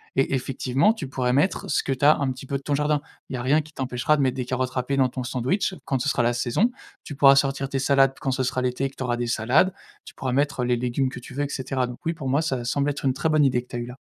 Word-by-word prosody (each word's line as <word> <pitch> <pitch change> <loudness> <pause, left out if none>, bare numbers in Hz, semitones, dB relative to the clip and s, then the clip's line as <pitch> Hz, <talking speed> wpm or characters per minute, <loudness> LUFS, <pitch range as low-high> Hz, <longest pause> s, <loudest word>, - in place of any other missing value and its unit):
et 135 +1 +1
effectivement, 130 - +1
tu 175 - -5
pourrais 125 -2 -1
mettre 160 +6 +1
ce - - +1
que - - -2
tu 130 - -7
as 150 +2 +7
un 135 -2 0
petit 130 +1 -9
peu 140 - -1
de 140 - -13
ton 145 - -1
jardin. 150 +1 +1 0.3
Il 130 - -4
y - - -2
a 120 - -4
rien 145 +5 +3
qui 155 +1 -16
t'empêchera 130 +3 0
de 140 - +1
mettre 130 0 +1
des 125 - -2
carottes 130 0 -2
râpées 130 +2 -2
dans 130 -1 +4
ton 130 - -5
sandwich 135 - -1
quand 135 -2 0
ce 140 - 0
sera 120 - +1
la 120 +1 +2
saison. 125 - +1 0.3
Tu - - -7
pourras 135 -1 +7
sortir 135 0 +1
tes 135 - -2
salades 135 0 +3
quand 135 - -1
ce 130 - -1
sera 130 0 -1
l'été 125 +2 -1
et - - -1
que 135 - -22
tu - - -5
auras 120 -1 -1
des 120 0 -2
salades. 120 +11 +3 0.3
Tu - - -12
pourras 130 -1 -3
mettre 140 -1 0
les 125 0 +1
légumes 125 +2 0
que 125 - -8
tu 125 - -11
veux 145 - 0
et 145 - -3
cetera. 130 -1 -2
Donc 125 0 -8
oui, 165 - +1
pour 155 -5 -6
moi, 140 +4 +2
ça 130 -7 -2
semble 140 +3 0
être 140 -1 -4
une 130 - +3
très 155 +4 -1
bonne 155 -2 +4
idée 125 -2 +2
que 125 - -21
tu - - -9
as - - -2
eue 120 - -4
là. 125 +2 -10
135 Hz, 320 wpm, -24 LUFS, 125-140 Hz, 0.3 s, as